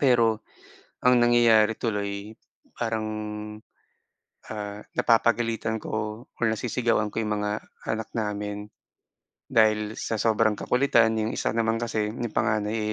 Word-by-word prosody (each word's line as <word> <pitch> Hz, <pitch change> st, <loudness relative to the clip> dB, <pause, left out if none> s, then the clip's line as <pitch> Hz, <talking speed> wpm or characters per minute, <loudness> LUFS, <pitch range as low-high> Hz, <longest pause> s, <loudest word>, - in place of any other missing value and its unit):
Pero, 115 Hz, -4 st, +4 dB, 0.6 s
ang 125 Hz, -1 st, +5 dB
nangyayari 115 Hz, -2 st, +5 dB
tuloy 100 Hz, -1 st, -3 dB, 0.4 s
parang, 110 Hz, -2 st, -1 dB, 1.5 s
ah, 105 Hz, -1 st, -5 dB, 0.2 s
napapagalitan 115 Hz, -1 st, +2 dB
ko 110 Hz, +2 st, -4 dB
or -, -, +2 dB
nasisigawan 115 Hz, -2 st, 0 dB
ko -, -, -1 dB
'yong 105 Hz, -, -1 dB
mga 105 Hz, -, -1 dB, 0.4 s
anak 110 Hz, -1 st, -2 dB
namin, 105 Hz, -1 st, -3 dB, 0.8 s
dahil 110 Hz, -1 st, +3 dB
sa 110 Hz, -, -2 dB
sobrang 110 Hz, -1 st, +2 dB
kakulitan. 120 Hz, -3 st, +3 dB
'Yong 110 Hz, +1 st, -1 dB
isa -, -, 0 dB
naman 115 Hz, 0 st, +1 dB
kasi 110 Hz, -2 st, -1 dB
'yong 120 Hz, -1 st, -5 dB
panganay 110 Hz, 0 st, +1 dB
110 Hz, 115 wpm, -26 LUFS, 105-115 Hz, 1.5 s, ang